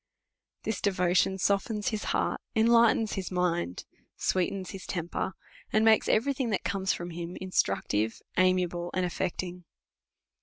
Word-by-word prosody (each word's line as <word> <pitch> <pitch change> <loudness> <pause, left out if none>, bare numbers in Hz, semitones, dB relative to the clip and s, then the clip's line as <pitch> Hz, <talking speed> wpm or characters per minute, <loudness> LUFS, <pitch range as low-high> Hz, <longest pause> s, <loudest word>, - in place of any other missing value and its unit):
This 220 -3 -2
devotion 185 -1 +2
softens 200 +2 0
his 215 -2 -3
heart, - - 0
enlightens 225 -1 +4
his 190 -2 -3
mind, 175 - -1 0.3
sweetens 185 0 -1
his 190 -2 -8
temper, 175 +1 -3 0.4
and 215 +1 +3
makes 220 -1 +5
every 275 +6 +3
thing 260 -3 -2
that 205 - -1
comes 190 0 0
from 175 0 -4
hini 170 +1 -6
instructive, 110 - 0 0.2
amiable, 180 -1 +2
and 185 -1 +1
afiecting. 180 0 -3
185 Hz, 130 wpm, -29 LUFS, 175-210 Hz, 0.4 s, makes